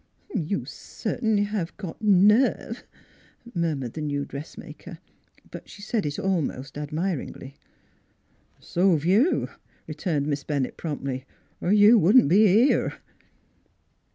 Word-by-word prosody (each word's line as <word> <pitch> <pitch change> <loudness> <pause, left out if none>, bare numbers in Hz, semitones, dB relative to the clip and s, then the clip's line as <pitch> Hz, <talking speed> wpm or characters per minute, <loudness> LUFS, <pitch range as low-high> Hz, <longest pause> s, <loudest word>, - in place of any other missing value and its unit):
" - - -16 0.2
You 200 - 0
cert'nly 215 - -2
have 205 -5 -4
got 190 -4 -8
nerve" 210 +4 +3 0.7
murmured 155 - -2
the 155 - -5
new 145 -1 -2
dressmaker; 140 +3 -10 0.5
but - - -10
she 205 - -12
said 210 -5 -1
it 145 - -4
almost 150 -8 -2
admir 155 +5 -2
ingly. 135 +1 -10 0.6
" - - -40
So 180 -1 +3
've 150 - -6
you," 215 - +3 0.4
returned 155 -1 -2
Miss 145 -1 -2
Bennett 140 -4 -2
promptly, 135 -4 -5 0.2
" - - -39
er 180 - 0
you 210 +2 +7
wouldn't 205 - +5
be 210 +5 +6
here." 220 +9 +3
175 Hz, 130 wpm, -25 LUFS, 145-205 Hz, 0.7 s, you